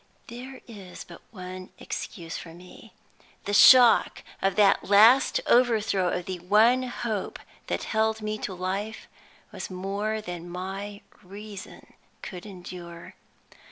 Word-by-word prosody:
There 255 +2 -9
is 195 -6 -10
but 170 - -14
one 185 -2 -9
excuse 165 -1 -7
for 165 -1 -9
me. 180 +1 -15 0.5
The 205 - -3
shock 245 +3 +6 0.2
of 195 -1 +1
that 200 -2 +4
last 220 +7 +5
overthrow 220 -6 +2
of 180 0 -3
the 185 -1 -5
one 215 +8 +4
hope 235 -5 -4 0.3
that - - -2
held 220 0 0
me 215 0 -4
to 190 - -5
life 195 +4 -4 0.4
was - - -7
more 200 +4 -3
than 175 -4 -7
my 195 +3 -6 0.2
reason 200 +1 -11 0.3
could 180 +2 -8
endure. 175 -3 -10
200 Hz, 125 wpm, -26 LUFS, 180-220 Hz, 0.5 s, shock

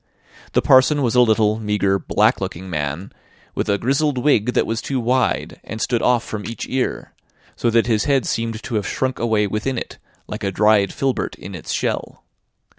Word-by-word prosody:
The - - +2
parson 135 +2 +5
was 120 - +1
a 125 - +5
little, 110 -2 +3
meagre, 105 -2 +1
black - - +2
looking 95 +2 -5
man, 75 +4 -3 0.4
with - - -2
a 100 - +2
grizzled 135 +5 0
wig 125 -3 +2
that - - +2
was 115 +1 -2
too 135 -2 -2
wide, 125 +2 0
and 110 - -7
stood 120 +1 0
off 125 -1 +2
from 105 -1 -6
each 115 - -5
ear; 130 -1 -2 0.4
so 120 - 0
that 115 0 +3
his 110 -3 +1
head 140 -3 +2
seemed 115 -1 -2
to 135 - -6
have 105 - -2
shrunk 130 -1 -2
away 110 -3 +1
within 110 +6 -2
it, - - -6 0.3
like - - -7
a 100 - 0
dried 105 0 +3
filbert 135 -3 -2
in 100 - -10
its 90 - -7
shell. - - -3
115 Hz, 190 wpm, -20 LUFS, 105-125 Hz, 0.4 s, parson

